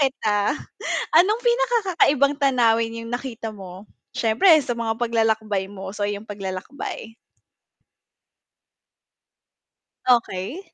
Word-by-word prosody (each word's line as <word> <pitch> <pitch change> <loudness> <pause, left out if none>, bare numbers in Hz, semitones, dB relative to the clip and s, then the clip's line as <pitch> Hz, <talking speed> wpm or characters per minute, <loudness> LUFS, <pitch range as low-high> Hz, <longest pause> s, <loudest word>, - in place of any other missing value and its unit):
kita, 215 -4 +1 0.6
anong 415 +8 +4
pinaka-kakaibang 405 - +2
tanawin 230 -4 +2
yung 230 - -8
nakita 240 -2 -5
mo? 195 -1 -11 0.2
Siyempre 225 - +2
sa 240 -3 -4
mga 230 -1 -1
paglalakbay 220 -4 0
mo? 195 -1 -8
So 205 -1 -2
yung 205 +1 -4
paglalakbay. 200 +4 -6 2.9
Okay. 235 - +1
230 Hz, 90 wpm, -23 LUFS, 205-280 Hz, 2.9 s, anong